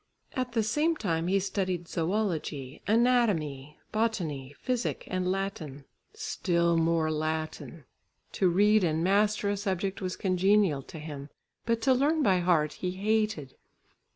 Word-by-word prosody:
At 255 -2 -3
the 225 -3 +2
same 300 +10 +1
time 170 - -1
he 195 +2 +3
studied 185 -3 -2
zoology, 165 -7 -2
anatomy, 200 - +1
botany, 165 -12 -2
physic 250 -2 -2
and 185 0 0
Latin, 165 -8 -4 0.3
still 170 - 0
more 165 -1 +2
Latin! 155 0 -4 0.5
To 185 - +2
read 205 +3 +4
and 160 -1 +1
master 205 +2 +2
a - - 0
subject 195 -1 -2
was 185 -1 -3
congenial 190 -4 +2
to 160 - -11
him, 150 -2 -7 0.4
but 230 -1 0
to 265 - +5
learn 295 +4 +2
by 190 -6 +4
heart 165 -4 +2
he 180 - -3
hated. 210 -8 -1
185 Hz, 135 wpm, -29 LUFS, 160-215 Hz, 0.5 s, to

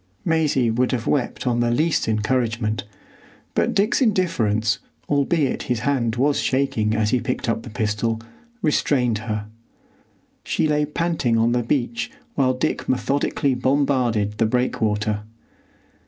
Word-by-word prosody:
Maisie 150 -8 +2
would 125 +3 +1
have 120 -2 -2
wept 135 -5 -1
on 120 -1 +1
the 120 0 +2
least 155 +7 +1
encouragement, 110 0 0 0.7
but - - +1
Dick's 210 +7 +2
indifference, 115 - +1 0.3
albeit 145 0 +1
his 120 -3 0
hand 120 -4 0
was 140 +3 +2
shaking 130 -5 +1
as 105 -1 +1
he 125 - +3
picked 125 +1 -3
up 115 -1 0
the 120 - -9
pistol, 110 0 -1 0.4
restrained 125 -7 +2
her. 105 -1 -3 1.0
She - - 0
lay 150 0 +2
panting 150 -7 0
on 115 +1 +3
the 120 0 +2
beach 145 - -1 0.2
while 130 - +2
Dick 125 - -2
methodically 135 +1 +1
bombarded 125 -5 +1
the 115 - +3
breakwater. 110 -3 0
125 Hz, 135 wpm, -22 LUFS, 110-140 Hz, 1.0 s, he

